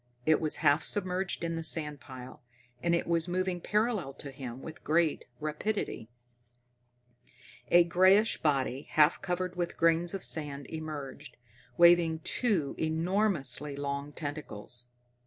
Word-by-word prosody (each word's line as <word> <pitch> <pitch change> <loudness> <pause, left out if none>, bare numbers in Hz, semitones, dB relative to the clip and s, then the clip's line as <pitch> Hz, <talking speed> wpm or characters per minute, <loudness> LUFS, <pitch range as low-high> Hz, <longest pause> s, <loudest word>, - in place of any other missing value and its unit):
It 155 -1 +3
was 155 -1 +1
half 145 +3 +4
submerged 185 -2 -1
in 165 0 -2
the 165 - -4
sand 150 -3 0
pile, 130 0 -11 0.4
and 170 0 +2
it 170 - -1
was 170 0 0
moving 180 0 -1
parallel 210 - 0
to 140 - -9
him 130 -2 -8
with 160 - -10
great 160 0 +1
rapidity. 155 - -3 1.6
A 175 0 +7
grayish 185 +5 +4
body, 135 -3 0
half 155 +1 +4
covered 180 0 -2
with 175 -1 -3
grains 165 +2 +2
of 195 - -5
sand 145 -3 +2
emerged, 150 -6 -7 0.4
waving 170 -2 +5
two 195 - 0
enormously 160 - 0
long 140 0 -4
tentacles. 130 -6 -6
160 Hz, 130 wpm, -30 LUFS, 145-175 Hz, 1.6 s, A